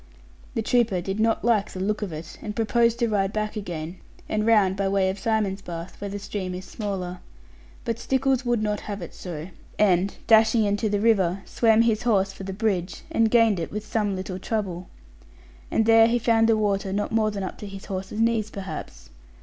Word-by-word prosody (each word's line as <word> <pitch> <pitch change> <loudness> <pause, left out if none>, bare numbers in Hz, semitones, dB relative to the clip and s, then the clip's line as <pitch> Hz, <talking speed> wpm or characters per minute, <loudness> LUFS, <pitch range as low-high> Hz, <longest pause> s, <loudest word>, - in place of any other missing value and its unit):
The 225 - 0
trooper 230 -5 +2
did 195 +4 -3
not 225 0 +1
like 220 -4 +2
the 185 - -8
look 210 +3 -1
of 205 -4 -3
it, 160 +1 -8
and 210 - -5
proposed 235 0 +2
to 240 -1 +1
ride 200 -3 +1
back 215 0 -2
again, 175 -4 -5 0.3
and 215 +1 -1
round 205 -4 +4
by 195 0 0
way 195 -1 +2
of 195 - -8
Simonsbath, 195 -7 -2
where 200 - -3
the 200 - -4
stream 195 -2 -4
is 185 +1 -7
smaller. 185 -4 -4 0.7
But 230 -1 -2
Stickles 265 0 +1
would 240 -3 +1
not 210 -1 0
have 200 -3 -4
it 170 - -9
so, 170 -1 -7 0.3
and 195 -2 +3
dashing 220 0 +5
into 205 +1 0
the 205 0 0
river, 195 -4 +2
swam 225 -1 +3
his 225 -1 +1
horse 195 -5 +2
for 195 - -11
the 195 - -4
bridge, 190 -3 -2
and 225 -8 +3
gained 225 -4 +4
it 165 - -4
with 210 +1 -5
some 210 -2 -1
little 185 0 -5
trouble; 190 -4 -3 0.8
and 225 - +2
there 225 0 +7
he 235 +1 +2
found 225 -1 +3
the 225 - +4
water 200 -2 0
not 205 +2 -1
more 220 -1 +2
than 200 -2 -4
up 185 - -6
to 210 - -7
his 195 -1 -9
horse's 190 +2 -5
knees 225 -2 +2
perhaps. 190 - -8
205 Hz, 205 wpm, -25 LUFS, 190-225 Hz, 0.8 s, there